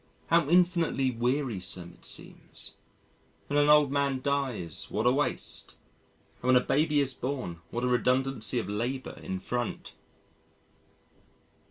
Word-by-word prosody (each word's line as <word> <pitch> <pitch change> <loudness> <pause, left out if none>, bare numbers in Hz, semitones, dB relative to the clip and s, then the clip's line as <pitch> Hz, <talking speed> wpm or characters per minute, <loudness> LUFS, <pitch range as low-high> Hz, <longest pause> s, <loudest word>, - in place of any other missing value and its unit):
How 165 -3 +4
infinitely 170 -6 +3
wearisome 115 -8 -2
it - - -16
seems. - - -7 0.7
When 145 +1 +1
an 145 0 +4
old 150 -2 +6
man 140 -2 +1
dies 130 - -2
what - - -1
a 125 - +6
waste, 135 -1 -2 0.7
and 125 - -4
when 130 - +6
a - - +8
baby 150 0 +2
is 135 -2 0
born 125 -10 -4
what 120 +5 -3
a - - +2
redundancy 125 +1 +1
of 115 - -1
labour 120 +6 -3
in 95 0 -4
front! 120 +4 -3
130 Hz, 135 wpm, -29 LUFS, 120-145 Hz, 0.7 s, a